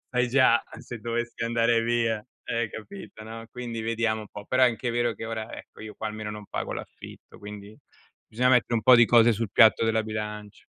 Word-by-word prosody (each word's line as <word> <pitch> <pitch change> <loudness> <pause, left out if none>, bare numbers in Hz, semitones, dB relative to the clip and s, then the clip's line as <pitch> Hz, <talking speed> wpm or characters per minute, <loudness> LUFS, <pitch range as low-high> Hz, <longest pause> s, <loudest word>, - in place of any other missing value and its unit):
sai 125 -1 +1
già 125 -2 +4 0.2
se 120 - -8
dovessi 120 +1 -4
andare 115 0 +2
via, 115 -2 0 0.2
eh, 115 -1 -1
capito, 175 - -10
no. 115 +1 -9
Quindi 120 -2 -6
vediamo 115 0 -1
un 105 - -10
po', 105 - -9
però 130 +4 +1
è - - +7
anche 120 0 -1
vero 120 -1 0
che 110 - -8
ora, 110 0 -5
ecco, - - -13
io 110 -1 -9
qua 110 - -4
almeno 105 0 -6
non 105 0 -8
pago - - -4
l'affitto, - - -11
quindi 105 0 -10 0.5
bisogna 125 +3 +1
mettere 125 -1 +3
un 110 - 0
po' 130 - +8
di 120 -1 +6
cose 120 0 +6
sul 110 -1 -3
piatto 110 +2 +5
della 110 0 +1
bilancia. 105 -1 -6
115 Hz, 205 wpm, -26 LUFS, 110-120 Hz, 0.5 s, po